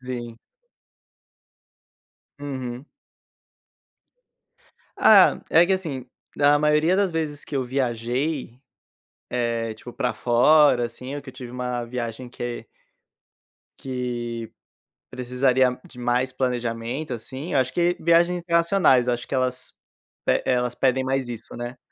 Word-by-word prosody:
Sim. 120 -2 -6 2.0
Uhum. 130 -3 -5 2.1
Ah, - - +6
é 165 - +7
que 190 - +1
assim, 150 -9 -3 0.3
a 145 +1 +5
maioria 150 +3 +3
das 195 -1 +2
vezes 155 -3 -3
que 145 - -4
eu 130 - 0
viajei, 125 +1 -2 0.7
é, 115 -2 -1
tipo, 120 +2 -11
pra 125 -3 -1
fora 125 +1 +4
assim 125 +4 -7
ou 145 - -5
que 135 - -10
eu - - -13
tive 125 -2 -9
uma 125 -1 -3
viagem 120 0 -5
que 120 0 -6 1.1
que 120 -3 -4 0.6
precisaria 125 0 +1
de 125 - -16
mais 125 +2 0
planejamento, 125 +2 -2
assim, 130 +7 -7
eu - - +4
acho 130 - -1
que 175 0 +1
viagens 170 +2 +3
internacionais, 170 -6 +3
eu 125 - +3
acho 120 - -7
que - - -5
elas 130 -1 -2 0.5
pe - - +2
elas 125 -1 +1
pedem 130 +1 +1
mais 135 -1 -1
isso, 115 -1 -7
né? 120 +1 -6
125 Hz, 125 wpm, -24 LUFS, 120-145 Hz, 2.1 s, é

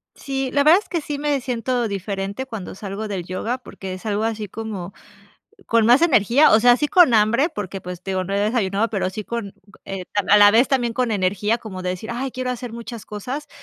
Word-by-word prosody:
Sí, 270 -1 -3
la 285 - +3
verdad 320 +5 +7
es - - -25
que 340 -3 -1
sí 290 0 -4
me 290 -1 0
siento 245 -1 -1
diferente 200 +3 -4
cuando 225 -9 -7
salgo 200 +2 -5
del 195 -4 -4
yoga, 185 +8 -3
porque 190 -7 -8
salgo 210 +2 -2
así 220 -2 -2
como 200 -3 -6 0.7
con 230 -1 +3
más 245 +6 +6
energía. 265 - +5
O 220 - +6
sea, 245 +1 +6
sí 295 - 0
con 325 -5 +5
hambre, 225 +8 +3
porque, 195 - -6
pues, 180 -1 -7
te 195 +1 -5
digo, 185 0 0
no 190 +2 -5
he 200 - +1
desayunado, 210 0 0
pero, 195 -4 -2
sí 210 +2 -6
con 225 -4 -5 0.3
eh, 195 -1 -6 0.3
a 205 - +8
la 205 0 +7
vez 235 +4 +4
también 245 -4 +1
con 245 0 -1
energía, 205 +2 0
como 195 -5 -8
de 180 - -1
decir: 185 +4 -6
"Ay, 260 +3 -3
quiero 255 0 -3
hacer 245 -1 -5
muchas 235 -1 -8
cosas", 255 +8 -6
225 Hz, 220 wpm, -21 LUFS, 200-250 Hz, 0.7 s, a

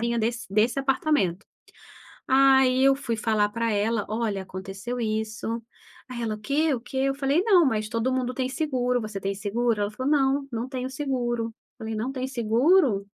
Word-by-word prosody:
vinha 235 0 0
desse 230 0 -2
desse 220 +6 +2
apartamento. 270 - +1 0.8
Aí 265 -1 +5
eu 275 - +6
fui 270 -4 -3
falar 215 -1 +1
pra 230 +1 -1
ela: 210 +1 0
"Olha, 215 -3 -1
aconteceu 195 +6 -6
isso". 220 +1 -3 0.5
Aí 245 -1 -5
ela: 220 -2 -2
"O - - -12
quê? 285 +7 +1
O 245 - -3
quê?" 265 - -7
Eu 270 - 0
falei: 280 +4 +1
"Não, 380 -6 +5
mas 215 -5 0
todo 230 +3 -1
mundo 255 -1 -1
tem 255 0 -2
seguro, 255 -4 0
você 215 -3 -5
tem 195 +1 -1
seguro?" 220 +3 -1
Ela 205 0 -1
falou: 260 +6 -2
"Não, 275 -1 +2
não 235 +2 -3
tenho 260 -1 -4
seguro". 240 -4 -2 0.2
Falei: 220 0 -5
"Não 230 +5 -2
tem 260 -1 -3
seguro?" 240 - +2
240 Hz, 180 wpm, -25 LUFS, 215-265 Hz, 0.8 s, eu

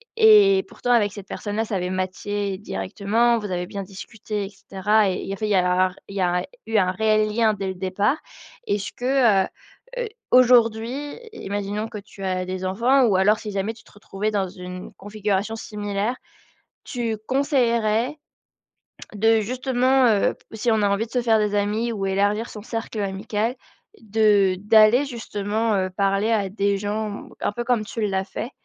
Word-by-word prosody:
et 415 -4 +6
pourtant 245 - -3
avec 215 -4 +3
cette 200 -1 -10
personne-là, 215 +1 -3
ça 210 - -3
avait 180 -1 -1
matché 190 +1 -3
directement. 210 - 0
Vous 205 -3 -6
avez 180 0 -2
bien 200 +1 -6
discuté 205 +2 -6
et 195 - -7
cetera 200 +1 +1
et 185 - -1
il - - -5
y 195 - -3
avait 215 +2 -3
il - - -3
y 205 - +3
a 180 0 +3
r 180 - -15
il 200 - -10
y 195 - -1
a 180 0 +1 0.2
eu 225 -1 +1
un 185 -2 +3
réel 215 +2 +2
lien 220 -1 +3
dès 195 -2 -4
le 190 - -2
départ. 190 +9 0 0.5
Est-ce 205 0 -1
que, 245 -6 +3 0.5
heu, 485 -2 -2 0.2
aujourd'hui, 245 +2 +3 0.2
imaginons 205 - -3
que 220 - -8
tu 200 -1 -12
as 185 -1 -1
des 185 0 -5
enfants 245 +8 +3
ou 210 -5 +2
alors 205 +3 +4
si 210 - -6
jamais 200 +2 -2
tu 225 - -18
te - - -21
retrouvais 205 0 -4
dans 200 -2 0
une 180 0 -9
configuration 205 +1 -2
similaire, 210 +1 -3 0.7
tu 230 -3 -3
conseillerais 250 -2 +1 1.0
de 225 +2 +3
justement, 255 +3 +2
heu, 210 -3 +2 0.2
si 225 +2 -1
on 220 -1 +2
a 205 - +3
envie 200 +3 0
de - - -22
se 250 - 0
faire 225 -2 +3
des 210 -1 0
amis 210 +3 0
ou 200 -3 -3
élargir 205 +4 +1
son 210 - -8
cercle 225 -1 -4
amical, 205 +4 -2 0.5
de 205 -3 +3
d'aller 215 +5 +5
justement, 220 -3 -2
heu, 185 -1 0
parler 195 +3 +1
à 210 -4 +1
des 200 0 0
gens 210 +1 -4
un - - -1
peu 240 +2 -4
comme 235 -3 +1
tu 225 +2 -6
l'as 195 -2 0
fait, 215 +5 -6
210 Hz, 180 wpm, -23 LUFS, 195-230 Hz, 1.0 s, et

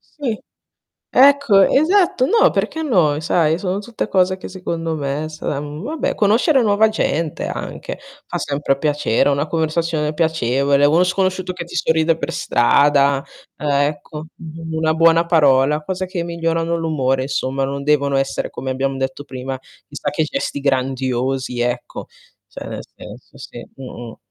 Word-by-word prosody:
Sì. 250 -8 -5 0.8
Ecco, 280 -7 +6
esatto. 320 - +3
No, 455 - +4
perché 215 +11 -2
no, 180 - +2
e 155 - -4
sai, 160 -1 +2
sono 185 +1 -2
tutte 220 +1 -5
cose 185 0 +2
che - - -9
secondo 170 -3 -4
me 145 +1 -3
sa 150 -2 -4
mhmm, 150 +4 -7
vabbè 310 +4 -2
conoscere 240 - +3
nuova 215 0 +3
gente 165 -7 -1
anche - - -6 0.3
fa - - -3
sempre 140 -1 -1
piacere, 145 -3 +1
una 145 +2 0
conversazione 160 -1 -1
piacevole, 140 -3 +1
uno 165 +5 +4
sconosciuto 185 0 -1
che 175 - -6
ti 170 - -11
sorride 160 0 +2
per - - -4
strada, 140 +2 +3 0.3
ehm, 150 - -3
ecco, 145 +2 -1
mhmm, 165 0 -8
una 160 0 +1
buona 165 +1 +4
parola, 150 -2 +3
cose 185 +2 -3
che 185 -1 -4
migliorano 165 0 -1
l'umore 140 -6 0
insomma, 135 0 -2
non 140 +1 -3
devono 140 -2 +2
essere 135 0 -1
come 130 +1 -5
abbiam 135 +1 -2
detto 135 +1 -3
prima, 130 -1 -6 0.3
chissà 145 - -4
che 160 +2 0
gesti 155 - -3
grandiosi, 130 -2 -1
ecco. 120 0 -3 0.4
Cioè - - -9
nel - - -6
senso - - -13
sì, - - -10
mh-mh. 120 -3 -9
155 Hz, 155 wpm, -19 LUFS, 140-180 Hz, 0.8 s, Ecco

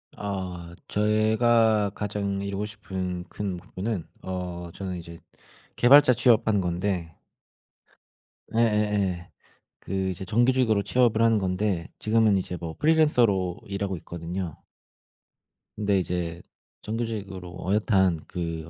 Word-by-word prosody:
아 90 -4 -5
제가 110 0 +3
가장 100 -1 -2
이루고 100 +1 -3
싶은 95 -4 -5
큰 100 -3 -4
목표는 95 +1 -4 0.2
어 90 -2 -5
저는 95 -2 -5
이제 85 -1 -9 0.6
개발자 130 +1 +7
취업하는 110 -3 +3
건데 90 -2 -2 1.4
예예예. 105 -6 +1 0.5
그 95 0 -2
이제 95 0 -5
정규직으로 120 0 +3
취업을 120 -3 +2
하는 115 -1 +4
건데 95 -2 -1
지금은 110 -2 +3
이제 90 -1 -3
뭐 80 -1 -6
프리랜서로 120 - +3
일하고 100 -2 -3
있거든요. 85 0 -5 1.2
근데 100 -2 +1
이제 85 -2 -2 0.4
정규직으로 105 -5 -4
어엿한 95 -4 +1
그 85 -2 -4
100 Hz, 245 characters per minute, -26 LUFS, 90-110 Hz, 1.4 s, 개발자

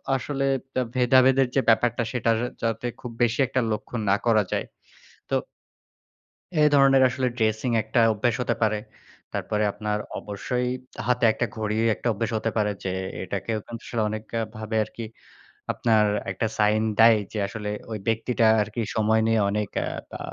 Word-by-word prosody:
আসলে 135 +1 -2 0.3
তা 130 - +1
ভেদাভেদের 130 +1 +5
যে 135 - +4
ব্যাপারটা, 120 +1 +3
সেটার 115 -2 +1 0.3
যাতে 115 +1 -1
খুব 125 - -6
বেশি 120 +2 +1
একটা 130 0 0
লক্ষণ 110 +2 -3
না - - +5
করা 110 -3 +4
যায়। - - -1 0.6
তো - - +1 1.2
এ - - +2 0.2
ধরনের 135 -1 +6
আসলে 130 +1 -1
ড্রেসিং 110 +2 +1
একটা 120 - +1
অভ্যাস 110 +2 0
হতে - - 0
পারে। 110 -1 +2 0.5
তারপরে 105 0 -1
আপনার 105 0 -2 0.2
অবশ্যই 125 +5 -3 0.4
হাতে 125 0 +2
একটা 120 - -1
ঘড়ি 110 -1 -2 0.2
একটা 120 - -3
অভ্যাস 115 +3 -2
হতে 115 +1 -1
পারে 105 -1 +2
যে - - -1 0.3
এটাকেও 100 +4 -3
কিন্তু 115 0 -8
আসলে 115 -2 -1
অনেকভাবে 110 0 -4
আরকি 115 +2 -8 0.7
আপনার 110 -2 +3 0.3
একটা 110 - -1
সাইন 105 0 +3 0.2
দেয়, 115 -1 +8
যে 110 - -5
আসলে 105 +1 -5 0.2
ওই 110 - -2
ব্যক্তিটা 115 +1 +1 0.2
আরকি 110 +3 -3
সময় 110 0 +3
নিয়ে 115 0 +3
অনেক 105 0 -1 0.2
আ - - -2 0.3
বা - - -7
115 Hz, 155 wpm, -25 LUFS, 110-125 Hz, 1.2 s, দেয়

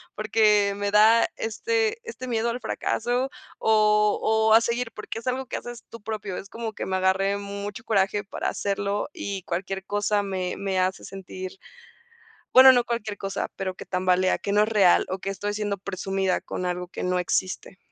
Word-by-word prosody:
porque 210 -1 +3
me 205 0 -2
da 220 +2 +6
este 440 - 0
este 465 - -7
miedo 235 -1 0
al 235 +1 -3
fracaso 245 +2 -1 0.3
o 210 -1 +3
o 220 0 +3
a 225 - +8
seguir 235 +1 -1
porque 215 +1 -6
es 230 - -12
algo 260 +1 -1
que - - -5
haces 240 -1 -9
tú 230 - -11
propio, 210 -3 -4
es 195 - -8
como 225 0 -5
que - - -5
me 190 - -1
agarré 190 +1 +2
de 200 - 0
mucho 200 +1 -6
coraje 205 -1 +1
para - - -3
hacerlo 200 +3 -2
y 200 - -4
cualquier 190 +2 -4
cosa 205 +1 +1
me 185 -2 -3
me 195 -1 -2
hace 185 +1 0
sentir 185 -1 -8 1.0
bueno, 265 0 +11
no 245 -2 +4
cualquier 220 -4 -3
cosa, 195 0 -3
pero 190 -1 -3
que - - -9
tambalea 185 0 +1
que 200 - -3
no 210 +1 +5
es 215 - +1
real 200 -5 +4
o 185 - -3
que 195 - -6
estoy 205 +1 -3
siendo 205 -1 -2
presumida 195 0 -1
con 180 - -5
algo 180 0 -2
que 180 - -7
no 180 0 0
existe. 185 +1 -2
205 Hz, 190 wpm, -25 LUFS, 190-225 Hz, 1.0 s, bueno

